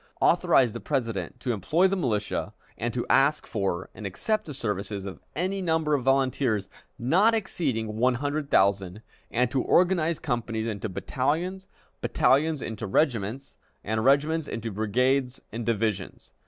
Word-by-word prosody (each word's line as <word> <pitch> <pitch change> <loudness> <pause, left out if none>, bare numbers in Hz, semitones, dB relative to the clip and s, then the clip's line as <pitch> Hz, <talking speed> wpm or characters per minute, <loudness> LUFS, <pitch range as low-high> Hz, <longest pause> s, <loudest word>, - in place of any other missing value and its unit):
authorized 125 -5 +4
the - - -5
President 115 - -2
to 125 - -2
employ 160 - +2
the 195 - 0
militia, 105 - -2 0.2
and 120 +1 -2
to 120 +1 -2
ask 145 +3 +3
for 95 -5 -2
and 105 - -6
accept 215 - -1
the 150 - -6
services 100 -4 -3
of 95 - -7 0.2
any 190 +4 -1
number 160 -3 +1
of 140 - +2
volunteers, 130 -6 +1 0.3
not 190 - +3
exceeding 125 - -2
one 125 +2 +3
hundred 145 +2 -2
thousand, 100 +1 +2 0.3
and 125 +1 +1
to 135 - +1
organize 170 -1 +3
companies 115 -4 -2
into 110 -1 -3
battalions, 165 - -2 0.3
battalions 150 +1 +2
into 110 -1 -5
regiments, 120 +1 0 0.3
and 110 +1 -1
regiments 150 +4 +3
into 115 0 -4
brigades 125 +5 +1
and 115 0 -5
divisions. 110 -4 -2
125 Hz, 145 wpm, -27 LUFS, 110-150 Hz, 0.3 s, authorized